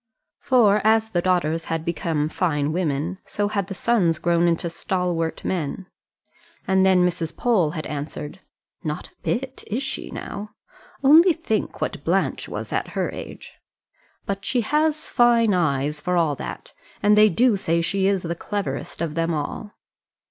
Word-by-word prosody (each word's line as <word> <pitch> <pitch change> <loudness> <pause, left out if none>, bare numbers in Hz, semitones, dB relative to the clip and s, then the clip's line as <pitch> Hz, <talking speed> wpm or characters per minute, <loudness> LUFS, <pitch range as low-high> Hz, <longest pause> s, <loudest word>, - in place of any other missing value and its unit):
for 215 -5 +4
as 220 0 +3
the 175 - +1
daughters 165 -3 +1
had 165 0 -3
become 165 -3 -1
fine 155 -3 0
women, 165 +1 -1
so 205 0 -2
had 200 -3 -1
the 195 - -6
sons 185 -8 +2
grown 170 +1 +2
into 170 0 +1
stalwart 170 -1 -2
men. 180 +1 -3 0.8
And 190 0 +3
then 185 -2 +5
Mrs. 170 -2 -2
Pole 215 -10 +2
had 155 - -4
answered: 150 +3 -6 0.4
"Not 150 -2 -4
a - - -35
bit; 260 +2 -3
is 235 +6 -2
she, 270 - -4
now? 210 +1 -7 0.5
Only 325 +6 +7
think 260 -10 -3
what - - -3
Blanche - - 0
was - - -5
at - - -3
her - - 0
age. - - -10 0.7
But 200 0 -3
she 245 +4 +1
has 305 +5 0
fine 235 -3 +4
eyes, 150 -3 0
for 180 0 0
all 160 -4 +2
that; - - -7 0.3
and 210 0 +5
they 215 0 +7
do 235 +5 +3
say 170 -3 0
she 190 +3 +1
is 195 -2 +1
the 170 0 -2
cleverest 200 0 -4
of 165 -3 -2
them 165 0 0
all." 155 +8 -5
185 Hz, 165 wpm, -23 LUFS, 165-215 Hz, 0.8 s, Only